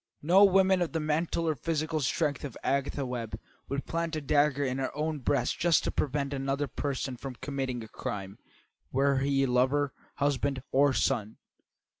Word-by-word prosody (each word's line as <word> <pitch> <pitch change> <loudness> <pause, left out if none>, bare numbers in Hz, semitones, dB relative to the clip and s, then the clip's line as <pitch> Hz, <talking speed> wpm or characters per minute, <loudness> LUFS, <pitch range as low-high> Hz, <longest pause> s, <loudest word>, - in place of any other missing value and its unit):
No 180 +6 +6
woman 190 -1 +4
of 170 - -1
the 165 - 0
mental 160 +2 0
or 160 - +3
physical 155 +2 -1
strength 145 0 0
of 140 -6 -6
Agatha 140 +1 0
Webb 120 -3 -4 0.3
would 140 +1 -2
plant 165 0 -2
a 155 - -2
dagger 145 0 +2
in 130 0 -1
her 130 - -1
own 155 0 -1
breast 130 -1 0
just 170 -3 +3
to - - -1
prevent 140 0 -1
another 135 +1 -1
person 130 -1 -3
from 130 0 -7
committing 130 -3 -3
a - - -9
crime, 100 -2 -6 0.5
were 135 +1 +2
he 135 0 +2
lover, 130 +3 +2 0.2
husband, 140 -2 0
or 140 +1 +4
son. 110 -4 0
140 Hz, 170 wpm, -29 LUFS, 130-155 Hz, 0.5 s, No